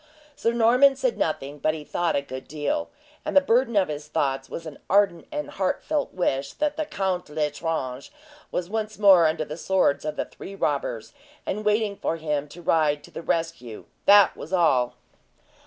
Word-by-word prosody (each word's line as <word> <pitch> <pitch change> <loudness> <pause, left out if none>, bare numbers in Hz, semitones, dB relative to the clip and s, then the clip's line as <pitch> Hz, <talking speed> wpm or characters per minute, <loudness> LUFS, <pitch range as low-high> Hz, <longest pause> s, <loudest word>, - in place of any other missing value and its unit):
Sir 230 - 0
Norman 245 +4 +5
said - - 0
nothing, 145 -2 -2
but 155 +2 +1
he 155 - -7
thought 175 +3 -1
a 140 - 0
good 130 -1 -8
deal, 155 - -2 0.3
and - - 0
the - - +11
burden 245 -3 +2
of 195 -2 +4
his 150 0 -6
thoughts 135 -3 -1
was 165 - -6
an 155 -3 -9
ardent 195 -4 +2
and 295 -1 -4
heartfelt 280 +10 -1
wish 140 -6 -1
that 300 -1 -1
the 310 -1 -3
Court 190 - -2
L'Estrange 150 - -3 0.4
was 180 - -2
once 215 +1 -3
more 190 -5 +7
under 155 0 -1
the 150 +2 -7
swords 180 -5 +1
of 155 0 -3
the - - -2
three 195 - -10
robbers, 140 - -2 0.3
and 210 +2 -3
waiting 210 -1 +1
for 165 - -2
him 150 -2 -2
to 170 +4 -12
ride 150 -3 +2
to - - -14
the - - -7
rescue 165 -10 -3 0.2
that 205 0 +7
was 160 - -9
all! 135 -9 +2
170 Hz, 185 wpm, -25 LUFS, 150-210 Hz, 0.4 s, the